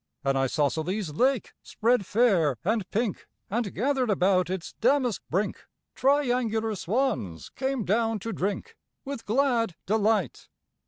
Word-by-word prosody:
An 135 0 +1
isosceles 155 - 0
lake 255 - +1
spread 230 -3 +1
fair 185 - +3
and 215 -2 0
pink, 220 -1 -2 0.2
And, 225 -2 -1
gathered 260 +1 0
about 185 -2 +2
its 185 -2 -4
damask 250 -2 +2
brink, 195 +5 -1 0.3
Triangular 245 -5 +1
swans 205 - -2
came 265 -4 -2
down 225 +3 +1
to 225 +1 -4
drink 205 - -3 0.3
With 275 -4 -6
glad 230 - +2
delight. 210 - 0
220 Hz, 120 wpm, -27 LUFS, 185-245 Hz, 0.3 s, fair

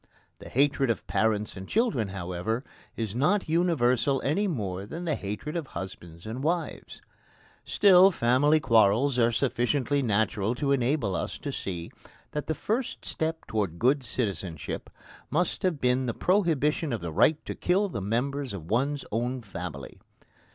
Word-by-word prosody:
The - - -10
hatred 140 0 +2
of 115 - -1
parents 105 -1 0
and 95 0 -8
children, 215 - +1
however, 95 +5 -3 0.3
is 110 -3 -3
not 180 - +2
universal 140 -6 +2
any 185 +9 +1
more 100 - -3
than 170 +9 -6
the 160 - +1
hatred 105 - -4
of 165 -5 -3
husbands 85 -3 -8
and 115 +5 -5
wives. 170 +2 -3 0.6
Still, 190 -1 +6
family 145 0 +3
quarrels 120 +2 +3
are 115 0 +4
sufficiently 135 +3 +1
natural 110 -1 +1
to 140 +2 0
enable 125 -6 +1
us - - -3
to - - -5
see 85 -3 -5 0.4
that 150 - -4
the 160 - -1
first 230 - -2
step 160 0 -3
towards 100 -6 -2
good 130 +7 +2
citizenship 95 - -4 0.4
must 175 +6 0
have 180 -7 0
been 125 0 +1
the 115 - -2
prohibition 160 -5 +1
of 115 - -2
the 85 -2 -5
right 155 - +4
to - - -4
kill 195 +4 +1
the 115 - -4
members 125 +5 -1
of 85 -2 -8
one's 140 +5 0
own 120 +3 -2
family. 85 - -7
125 Hz, 155 wpm, -27 LUFS, 105-150 Hz, 0.6 s, Still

